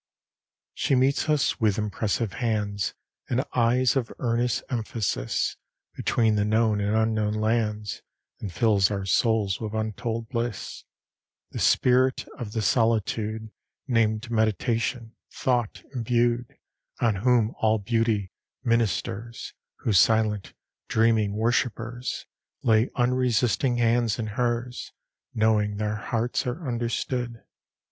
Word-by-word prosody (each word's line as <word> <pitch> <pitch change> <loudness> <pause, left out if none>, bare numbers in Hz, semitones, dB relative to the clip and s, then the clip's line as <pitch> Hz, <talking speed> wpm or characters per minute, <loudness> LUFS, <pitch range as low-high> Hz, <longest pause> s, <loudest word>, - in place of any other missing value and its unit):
LVII - - -68 0.7
She 135 - +1
meets 135 +4 +2
us 150 -3 +2
with 105 -3 +2
impressive 105 0 -1
hands 105 -5 -1 0.3
And 130 +2 +1
eyes 125 0 +3
of 130 -4 -1
earnest 120 0 0
emphasis 110 - -1 0.4
Between 110 -2 +2
the 105 -1 +2
known 110 0 +2
and 100 +2 0
unknown 110 -1 +1
lands, 110 -2 -1 0.4
And 100 - -5
fills 100 0 +3
our 100 -2 -3
souls 105 +1 +1
with 110 -1 -4
untold 110 +1 -3
bliss, 120 -4 -4 0.7
This - - 0
spirit 130 +1 +3
of 110 -4 -5
the 110 - -1
solitude 110 0 0 0.4
Named 115 -2 +1
Meditation; 115 +2 0 0.2
thought 120 -4 -1
imbued, 120 0 0 0.4
On 110 -4 +2
whom 120 +1 +2
all 110 0 +3
beauty 110 -2 0 0.3
ministers; 115 -1 -1 0.3
Whose 100 -6 +4
silent, 110 +1 +2 0.3
dreaming 110 -2 +2
worshipers 120 +1 -1 0.4
Lay 110 0 +3
unresisting 125 -2 +2
hands 115 -1 +2
in 115 - -2
hers, 120 +1 -2 0.4
Knowing 105 -2 +2
their 105 0 -1
hearts 115 +4 -1
are 145 +5 -4
understood. 120 0 -2
115 Hz, 115 wpm, -26 LUFS, 105-120 Hz, 0.7 s, Whose